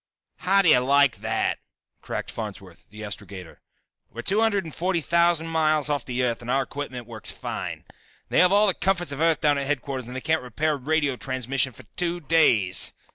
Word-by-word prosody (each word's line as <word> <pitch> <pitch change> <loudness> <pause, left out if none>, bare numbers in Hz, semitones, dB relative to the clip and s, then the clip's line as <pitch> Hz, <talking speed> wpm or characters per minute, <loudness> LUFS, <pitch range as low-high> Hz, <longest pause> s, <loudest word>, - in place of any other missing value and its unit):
"How 195 +2 +3
do 175 - +4
you 125 - +7
like 140 0 +3
that!" - - -1 0.4
cracked - - -5
Farnsworth, 95 -6 -8
the 105 +2 -10
astrogator. 95 -3 -8 0.5
"We're 120 - -8
two 205 - +3
hundred 210 -3 +2
and 160 - -9
forty 180 0 0
thousand 170 0 +2
miles 155 -2 +1
off 145 -4 -2
the 125 0 -2
Earth 120 -2 -1
and 120 - -8
our 135 +1 +2
equipment 130 -3 -7
works 110 -2 -5
fine. - - -6 0.5
They - - +2
have 180 0 +5
all 205 +1 +5
the 195 - +3
comforts 175 -5 0
of 140 +2 -4
Earth 165 -1 +2
down 145 -2 +3
at 140 - -3
headquarters 135 -3 -3
and 125 - -8
they 130 - -4
can't 160 +3 +1
repair 145 +5 -1
radio 145 -1 0
transmission 130 0 -1
for 130 - -15
two 175 0 0
days!" 135 - +3
140 Hz, 195 wpm, -24 LUFS, 125-165 Hz, 0.5 s, you